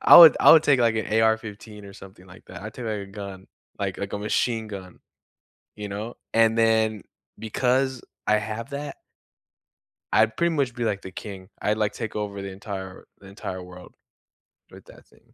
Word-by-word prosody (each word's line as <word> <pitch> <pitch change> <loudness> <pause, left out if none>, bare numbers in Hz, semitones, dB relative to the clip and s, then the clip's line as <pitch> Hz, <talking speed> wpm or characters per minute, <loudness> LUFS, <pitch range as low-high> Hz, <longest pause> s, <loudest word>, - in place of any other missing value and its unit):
I - - +9
would 165 -2 +11
I - - +9
would 160 -1 +7
take, 140 -4 +3
like, 115 -1 +3
an 110 - -1
AR-15 110 -1 -1
or - - -11
something 95 -1 -14
like 95 0 -15
that. - - -10
I 110 - -6
take, 120 +2 -8
like, 110 -2 -2
a 100 - -7
gun, 100 -1 -9 0.3
like 95 -2 -3
like, 100 - -5
a - - -2
machine 110 +2 0
gun, 95 -3 -9 0.8
you 105 -1 -6
know, 105 +4 -5 0.2
and 115 0 +4
then 110 -2 +2 0.4
because 130 +4 0 0.3
I 105 - +4
have 110 +5 -5
that 145 +1 -5 1.2
I'd 110 0 +3
pretty 170 -1 +1
much 135 -5 0
be, 120 -2 -3
like, 105 -3 -1
the 95 - -8
king. 95 0 -9
I'd 105 +1 +1
like 105 -1 +1
take 110 - -6
over 100 -1 -4
the 100 0 -6
entire 95 -1 -8
the 100 - -16
entire 95 -1 -7
world 90 0 -13 0.8
with - - -14
that - - -16
thing. - - -27
105 Hz, 190 wpm, -25 LUFS, 100-115 Hz, 1.2 s, would